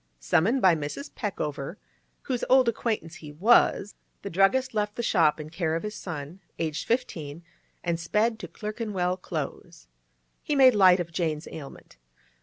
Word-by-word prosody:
Summoned 195 - +2
by 185 -2 +7
Mrs. 155 - -5
Peckover, 160 - -4 0.5
whose 250 -3 -2
old 260 -1 +6
acquaintance 215 -7 -2
he 150 -2 -10
was, 205 +3 +3 0.3
the 200 - -5
druggist 195 +10 +2
left 210 -1 -1
the 235 - -3
shop 165 -9 +3
in 155 0 -8
care 165 -2 -1
of 165 - -3
his 210 0 -4
son, 170 -3 -7 0.2
aged 160 -1 -3
fifteen, 170 - -2 0.4
and 170 -1 -1
sped 215 +7 0
to - - -6
Clerkenwell 210 -5 -3
Close. 160 -6 -6 0.6
He 295 - -1
made 260 -2 +7
light 185 -3 +6
of 170 -1 -4
Jane's 160 -2 -2
ailment. 140 - -11
180 Hz, 155 wpm, -27 LUFS, 160-220 Hz, 0.6 s, by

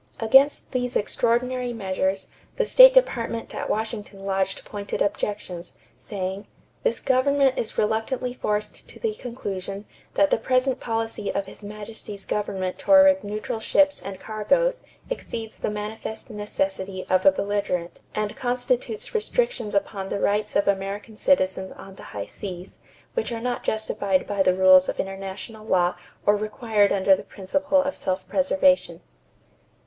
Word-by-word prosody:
Against 270 +6 +4
these 250 -1 -1
extraordinary 245 +3 0
measures, 190 -2 -1 0.3
the - - +1
State - - +9
Department 235 - +1
at - - -4
Washington 210 -2 -4
lodged 195 -1 -1
pointed 205 -1 -5
objections, 200 -4 -2 0.3
saying: 195 -1 -5 0.3
"This - - +1
government 270 +1 +3
is 225 - -4
reluctantly 225 +4 0
forced 210 -3 -3
to - - -11
the 450 -2 -1
conclusion 200 - -6 0.3
that 195 -1 +4
the - - +3
present 255 +2 +1
policy 225 -2 -2
of 200 - -2
His 195 - -12
Majesty's 210 -1 -7
government 190 -3 -2
toward 285 -1 +6
neutral 215 +2 -4
ships 290 +5 +3
and 190 -1 -7
cargoes 485 - +1 0.3
exceeds 225 - -5
the - - -1
manifest 215 +2 -6
necessity 195 -2 -3
of 185 0 +2
a 195 - +8
belligerent 190 -3 -2
and 215 0 -2
constitutes 445 - -2
restrictions 465 - -1
upon 195 -1 -1
the - - -2
rights 210 +1 0
of 200 - +2
American 200 +2 -2
citizens 190 -6 +1
on 195 - -12
the - - -13
high 100 -1 -5
seas, 180 - -8 0.3
which 470 - -2
are 230 - -3
not 245 +1 -2
justified 205 -3 0
by 200 -1 -1
the 185 -1 +4
rules 185 0 +6
of - - -4
international 195 +3 -6
law 180 -4 +2 0.3
or 205 - +5
required 215 -1 +1
under 195 0 +5
the - - -7
principle 280 +8 0
of 280 0 -3
self 185 0 -3
preservation." 280 0 +2
210 Hz, 145 wpm, -24 LUFS, 195-250 Hz, 0.3 s, State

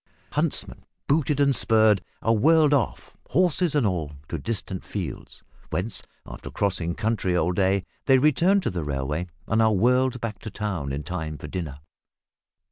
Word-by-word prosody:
Huntsmen, - - -2 0.2
booted 145 -1 +1
and 140 -1 +4
spurred, 110 -4 +4 0.2
are 115 - +3
whirled 155 +5 +5
off, 135 -7 -1
horses 180 -3 +2
and 145 -5 +3
all, 85 -7 -1 0.2
to 80 - -3
distant 95 0 -4
fields, 90 -10 -6 0.3
whence, 95 +4 -2 0.2
after - - -9
"crossing 90 -4 -1
country" 105 -5 0
all 85 +1 +2
day, 95 +1 +1 0.2
they 135 -1 +6
return 165 +8 +4
to - - -1
the 90 -3 -3
railway 75 +4 -2 0.2
and 110 +1 +2
are 110 -1 +4
whirled 125 +4 +2
back 110 -4 -4
to 110 - -7
town 95 -10 -3
in 70 +2 -3
time 80 -4 -4
for - - -9
dinner. 75 -6 -5
105 Hz, 160 wpm, -25 LUFS, 85-130 Hz, 0.3 s, they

